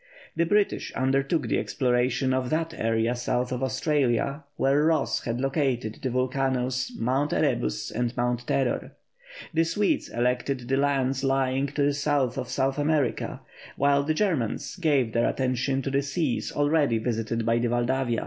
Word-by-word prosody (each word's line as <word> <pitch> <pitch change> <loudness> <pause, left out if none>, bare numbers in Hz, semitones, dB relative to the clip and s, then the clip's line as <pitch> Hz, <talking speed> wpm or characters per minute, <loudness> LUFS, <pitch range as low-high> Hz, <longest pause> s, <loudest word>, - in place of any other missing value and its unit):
The 170 0 +1
British 205 +2 +1
undertook 135 +4 +1
the - - +1
exploration 125 0 +1
of 130 -1 -1
that 165 +1 -1
area 115 +1 0
south 125 +1 -1
of 125 0 -2
Australia, 135 +1 0
where 140 +2 +2
Ross 160 -1 +1
had 115 0 -2
located 135 -5 -1
the 130 - -1
volcanoes 130 - 0
Mount 135 +5 0
Erebus 60 0 0
and 120 +1 -2
Mount 120 0 -1
Terror; 130 -3 0 0.6
the 165 +1 +3
Swedes 200 +5 0
selected 125 +1 -1
the 135 +1 +1
lands 135 -1 +1
lying 135 0 +1
to 140 +1 -1
the 145 0 +2
south 140 -3 0
of 125 - -5
South 135 +2 0
America, 145 -6 0 0.4
while 140 0 +3
the 155 +2 -1
Germans 155 - -1
gave 140 - +1
their 115 - +2
attention 130 +1 -1
to 135 - -2
the 140 +1 +2
seas 140 -6 -2
already 145 -4 +2
visited 115 0 -2
by 115 +1 +2
the 120 0 0
Valdavia. 120 0 0
130 Hz, 160 wpm, -26 LUFS, 120-145 Hz, 0.6 s, the